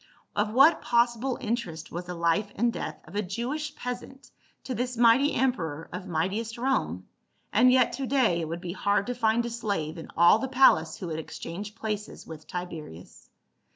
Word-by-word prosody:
Of 210 +1 +1
what 275 +7 +6
possible 240 +1 +1
interest 210 -9 -4
was 175 +1 -5
the 180 0 -6
life 170 +5 +1
and 235 +2 +1
death 155 - -5
of 165 - -12
a 210 - +1
Jewish 250 +10 -4
peasant 250 +2 -7 0.3
to 260 - -4
this 245 0 -3
mighty 240 +5 +5
emperor 165 - -1
of 180 +1 -6
might 165 +1 0
iest 225 +3 -4
Rome, 260 +2 -1 0.5
and 250 0 +6
yet 255 -2 +4
to 270 -1 -3
day 240 -11 +2
it 160 - -3
would 165 +2 -5
be 175 -2 -5
hard 200 0 +1
to 245 - -2
find 235 -1 +1
a - - -2
slave 200 -9 -3
in - - -9
all 170 +6 +6
the 265 - -2
palace 205 -12 +4
who - - -6
would 160 -1 -3
exchange 195 +6 -7
places 215 -2 -5
with 155 -1 -10
Tiberius. 160 - -8
215 Hz, 190 wpm, -27 LUFS, 170-245 Hz, 0.5 s, what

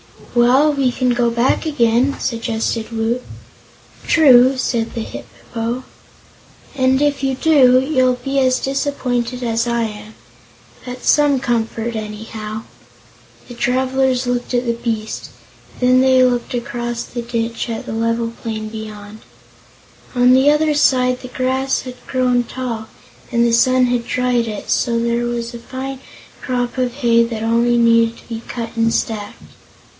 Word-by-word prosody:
"Well, 250 +5 +4
we 270 -3 +1
can 250 +1 0
go 240 -1 +2
back 235 +7 +1
again," 260 -2 +2
suggested 230 -1 -2
Woot. 230 +2 -1 0.9
"True," 265 -4 +6
said 235 -3 -1
the 230 - -2
Hip - - -8 0.3
po; 235 +2 -2 0.9
"and 260 0 +2
if 290 -2 +1
you 270 -1 0
do, 260 -4 +5
you'll 260 -2 +2
be 275 0 0
as 255 -1 +2
disappointed 255 -3 -2
as 230 0 0
I 235 0 0
am. 210 0 -7 0.7
That's 250 0 -7
some 290 -3 +4
comfort, 235 -1 -2
anyhow." 215 0 -6 0.8
The 245 - -9
travelers 260 +1 0
looked 245 0 -2
at 245 +1 0
the 235 - +1
beast, 230 -2 -4 0.5
and 250 - +2
then 255 0 +5
they 260 -1 +5
looked 245 -1 0
across 240 -1 -3
the 240 - -6
ditch 235 0 -3
at 225 - -4
the - - -5
level 230 +1 -1
plain 215 -2 -4
beyond. 215 -1 -9 1.0
On 250 0 +5
the 265 +2 +5
other 300 +1 +3
side 255 -3 +2
the 255 - -8
grass 260 +1 -1
had 255 -1 -8
grown 250 -2 +1
tall, 230 -3 -5 0.4
and 235 -1 +2
the 235 - +2
sun 255 +2 +4
had 245 -1 -1
dried 250 -2 0
it, 210 -2 -5
so 235 -2 +1
there 235 +1 0
was 240 0 -3
a 235 - -7
fine 265 +2 -6 0.4
crop 245 -1 -2
of 250 -1 0
hay 235 -4 +3
that 225 -2 -5
only 235 +1 +2
needed 230 0 +3
to - - -18
be 225 -1 -5
cut 235 -1 -6
and 230 0 +1
stacked. 210 -2 -3
240 Hz, 155 wpm, -18 LUFS, 230-255 Hz, 1.0 s, True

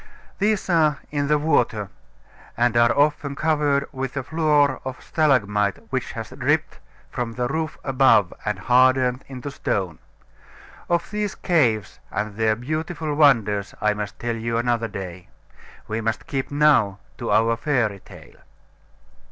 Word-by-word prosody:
These 210 0 +1
are 155 -5 +3
in 145 -1 -1
the 150 +1 +3
water, 120 -9 +1 0.7
and 120 0 +2
are 120 0 +5
often 145 -1 +1
covered 145 -2 +1
with 135 0 -5
a 135 - -1
floor 150 -2 +2
of 130 -1 -6
stalagmite 105 - +1
which - - -2
has - - -7
dripped - - -1 0.3
from 120 -2 -3
the 125 +1 -1
roof 155 +3 -3
above 130 -8 +3
and 105 -2 -2
hardened 125 +3 +3
into 135 +1 -7
stone. 95 - -2 0.9
Of 170 +1 0
these 210 -1 -2
caves 120 - +1
and 105 +1 -3
their 110 0 +2
beautiful 155 +5 -3
wonders 115 -9 +3
I 105 0 +2
must 105 -2 -6
tell 120 -1 -3
you 115 0 -2
another 120 -1 0
day. 95 -4 -8 0.6
We 110 +1 -2
must 110 0 -2
keep 135 -2 -3
now 145 -9 +3 0.2
to - - -4
our 115 +2 +3
fairy 115 -5 0
tale. - - -15
125 Hz, 145 wpm, -23 LUFS, 110-150 Hz, 0.9 s, are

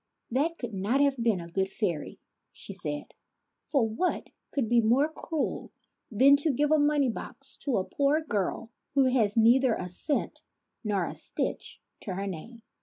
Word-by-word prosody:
" - - -48
That 310 +7 0
could 240 -3 -5
not 200 +8 0
have 280 -1 +3
been 225 -5 +2
a 170 - -7
good 190 +3 -1
fairy," 180 -8 -3 0.3
she 200 - -5
said; 150 -6 -3 0.3
" - - -54
for 265 -6 +3
what 230 +12 -2 0.2
could 270 -6 0
be 235 +1 +4
more 250 +7 +3
cruel 315 -1 -3 0.4
than 265 +6 +6
to 290 +3 +1
give 295 +2 +1
a 310 - +5
money 290 -1 +3
box - - -5
to 275 -4 -1
a 185 - 0
poor 285 +3 +1
girl 225 - -2 0.2
who 275 -1 +5
has 220 -4 +2
neither 240 +2 +5
a 180 - -5
cent 280 - -1 0.4
nor 200 -5 0
a - - -5
stitch - - -2 0.2
to 190 - -5
her 195 +1 -3
name 210 +6 -7
235 Hz, 180 wpm, -28 LUFS, 200-280 Hz, 0.4 s, than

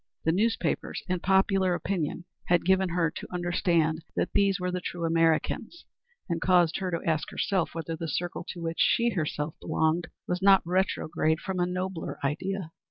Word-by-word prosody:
The 160 - +4
newspapers 225 +6 0
and 180 -2 -1
popular 190 -1 +3
opinion 175 -2 -2 0.2
had 175 -1 +3
given 190 0 +3
her 170 -2 +1
to - - -8
understand 170 -2 +1
that - - -1
these 200 -1 +3
were 180 0 -1
the 180 0 -3
true 170 0 -4
Americans, 165 - +1 0.4
and 170 -3 -2
caused 175 -3 +4
her 190 -1 -2
to 170 -2 -3
ask 155 -2 0
herself 185 -5 -1
whether 165 0 -3
the 165 +1 -5
circle 175 +4 -3
to 175 - -6
which 165 0 -3
she 235 0 +3
herself 155 -4 -2
belonged 160 +1 +1 0.2
was 180 +1 -1
not 195 0 +6
retrograde 170 -3 0
from 190 0 -4
a 175 - +2
nobler 185 -1 -3
ideal. 175 +4 -2
175 Hz, 170 wpm, -28 LUFS, 165-190 Hz, 0.4 s, not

